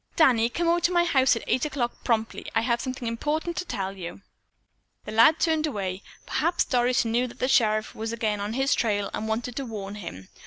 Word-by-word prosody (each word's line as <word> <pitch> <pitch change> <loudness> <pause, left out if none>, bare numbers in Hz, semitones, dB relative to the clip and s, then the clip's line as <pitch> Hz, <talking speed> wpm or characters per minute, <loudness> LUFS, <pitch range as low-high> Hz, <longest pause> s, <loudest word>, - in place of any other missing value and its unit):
"Danny, 240 -7 +4
come 340 +7 -1
over 340 +1 +3
to 345 - +2
my 345 -1 +4
house 265 -7 +4
tonight 230 - -3
at - - -10
eight 255 - +1
o'clock 265 -5 -3
promptly. 225 -2 -1
I 225 - +4
have 235 0 0
something 255 -2 -4
important 300 +9 -2
to 365 - -2
tell 195 - -4
you." 180 +1 -8 0.8
The - - -6
lad 230 +9 +5
turned 315 -2 +2
away. 195 -7 -3 0.2
Perhaps 335 +3 +1
Doris 245 -1 +2
knew 235 +2 +1
that 235 - -12
the 255 - 0
sheriff 215 -4 +2
was 225 +1 -4
again 220 -3 -1
on 205 +2 -3
his 270 +3 +2
trail 205 -3 0
and 220 - -3
wanted 230 +2 -2
to 275 - -2
warn 200 -3 -6
him. 95 - -8
235 Hz, 220 wpm, -26 LUFS, 215-270 Hz, 0.8 s, lad